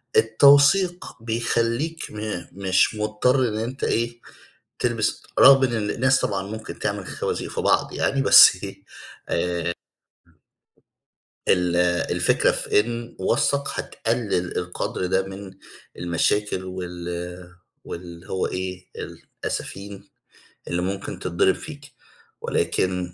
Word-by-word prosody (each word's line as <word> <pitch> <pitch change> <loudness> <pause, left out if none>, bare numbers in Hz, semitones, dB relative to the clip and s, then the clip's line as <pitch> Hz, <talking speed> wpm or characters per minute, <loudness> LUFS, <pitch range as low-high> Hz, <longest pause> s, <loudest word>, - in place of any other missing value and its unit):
التوثيق 140 +11 +5 0.2
بيخلّيك 115 +7 -1
م 105 -4 -5
مش 95 +3 +2
مضطَر 105 +5 +1
إن 105 - -4
أنت 120 +5 -4
إيه، 120 +1 -1 0.6
تلبِس 120 -3 -1 0.2
رغم 135 0 +8
إن 115 -5 0
الناس 130 +1 +2
طبعًا 95 -2 -1
ممكن 110 +2 -8
تعمل - - -3
خوازيق - - -3
في - - -3
بعض - - +1
يعني 135 0 0
بس - - +8
إيه - - -8 0.5
آآ 85 0 -1 1.8
ال 90 -2 +2 0.4
الفكرة - - +2
في - - +2
إن 115 +2 -5
وثّق 140 0 +1
هتقلّل 110 -6 -2
القدْر 90 +1 -3
ده 95 +1 +1
من 95 0 -9 0.5
المشاكل 90 +3 0
وال 90 -2 -6 0.8
واللي 85 0 -9
هو 95 - -1
إيه، 90 0 -5 0.6
الأسافين 100 0 -5 0.6
اللي 85 0 -1
ممكن 95 0 -4
تتضرَب 90 +1 +1
فيك 145 -2 -10 0.5
ولكن 90 -1 -1
105 Hz, 110 wpm, -23 LUFS, 90-120 Hz, 1.8 s, رغم